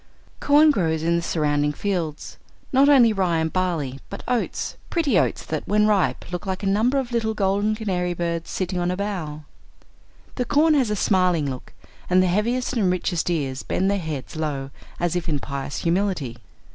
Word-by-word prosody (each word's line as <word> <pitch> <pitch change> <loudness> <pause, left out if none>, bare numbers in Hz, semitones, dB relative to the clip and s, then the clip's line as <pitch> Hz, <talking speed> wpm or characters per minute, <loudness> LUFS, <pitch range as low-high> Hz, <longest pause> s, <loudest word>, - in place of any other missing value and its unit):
Corn 300 +2 +5
grows 160 - 0
in 170 +1 +2
the 170 - +1
surrounding 150 -3 0
fields, 170 -5 -3 0.3
not 275 +2 +5
only 245 -6 +6
rye 185 -4 +1
and 160 0 -1
barley, 165 -8 -1
but - - -7
oats, 245 -1 -1
pretty 290 - +2
oats - - -1
that, 155 -1 -4
when 210 +1 +3
ripe, 205 -4 +1
look 180 +2 -5
like 190 +1 -3
a - - -1
number 220 +7 +2
of 260 -3 -2
little 225 -2 0
golden 205 +1 +1
canary 180 -5 -2
birds 170 -1 -3
sitting 185 -1 -2
on 175 0 0
a 180 - -2
bough. 175 -7 -4 0.9
The 250 - 0
corn 305 +5 +4
has 265 -6 +2
a 210 - 0
smiling 180 -7 +2
look 130 -2 -7 0.4
and 185 +1 +5
the - - +2
heaviest 230 +8 0
and 210 -7 +2
richest 180 -2 -1
ears 140 -6 -1
bend 190 +1 0
their 200 - 0
heads 155 -6 -5
low 145 -3 -3 0.3
as 175 0 0
if 175 -1 -2
in 150 - +1
pious 140 0 -5
humility. 170 - 0
180 Hz, 185 wpm, -23 LUFS, 160-210 Hz, 0.9 s, only